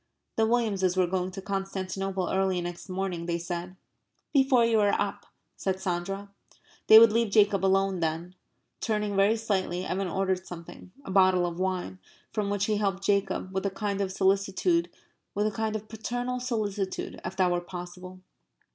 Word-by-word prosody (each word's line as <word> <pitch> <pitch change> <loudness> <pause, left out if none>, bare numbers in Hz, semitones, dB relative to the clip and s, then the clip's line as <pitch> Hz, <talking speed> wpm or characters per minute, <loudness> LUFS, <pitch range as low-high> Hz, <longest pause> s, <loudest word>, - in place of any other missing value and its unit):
The 220 0 +3
Williamses 200 -6 +1
were 185 - +4
going 180 +1 -1
to 190 +1 -8
Constantinople 195 -1 -3
early 190 -1 +1
next 175 +1 -6
morning, 185 -2 -3
they 170 0 0
said. 175 +1 -5 0.6
"Before 265 -4 +5
you 230 -1 +3
are 205 -1 +3
up," - - -3 0.3
said 190 -1 -1
Sandra. 195 +2 -3 0.6
They 220 - +10
would 225 -1 +9
leave 230 -1 +2
Jacob 200 -2 +4
alone, 195 -1 +2
then. 165 +2 -2 0.5
Turning 210 -2 -1
very 200 +3 +4
slightly, 190 -5 -1
Evan 195 +1 -1
ordered 190 +1 -1
something 175 +1 -10
a - - -5
bottle 185 -2 +4
of 170 0 -4
wine 185 - -2 0.3
from 210 -2 -1
which 205 0 0
he 215 -1 +1
helped 195 -2 -1
Jacob, 195 -1 0
with 190 +1 0
a - - 0
kind 200 +1 -2
of 190 -1 -1
solicitude, 195 - +2 0.5
with 205 - +1
a 215 - +1
kind 220 0 -2
of 215 0 -5
paternal 245 +3 -3
solicitude, 210 -6 -3
if 180 +2 -5
that 185 -2 +2
were 175 0 0
possible. 180 +1 -9
195 Hz, 170 wpm, -28 LUFS, 185-210 Hz, 0.6 s, They